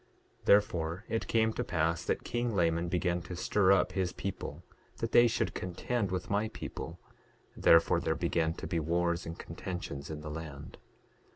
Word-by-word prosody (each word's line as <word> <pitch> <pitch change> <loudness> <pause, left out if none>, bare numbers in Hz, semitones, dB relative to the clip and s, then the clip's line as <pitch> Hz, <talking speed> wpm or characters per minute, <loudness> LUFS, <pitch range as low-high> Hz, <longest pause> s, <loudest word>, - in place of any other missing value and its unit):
9:13 - - -28
Therefore 90 -2 +3
it 115 - -1
came 110 -1 +2
to - - -2
pass 85 -1 0
that - - -1
king 120 -2 -1
Laman 85 -1 +2
began 90 0 0
to 90 - -7
stir 95 +2 +3
up 95 -3 +4
his 95 -2 -1
people 100 -1 -5 0.3
that - - -3
they 120 0 +7
should 115 - 0
contend 100 +4 -2
with 90 -1 -3
my 105 +2 +1
people; - - -7 0.6
therefore 85 0 +5
there - - 0
began 80 0 0
to - - -7
be 85 - -1
wars 85 +2 0
and 85 +1 -6
contentions 85 -5 -6
in 75 -1 -5
the 75 0 -6
land. 75 -2 -8
90 Hz, 175 wpm, -31 LUFS, 80-100 Hz, 0.6 s, they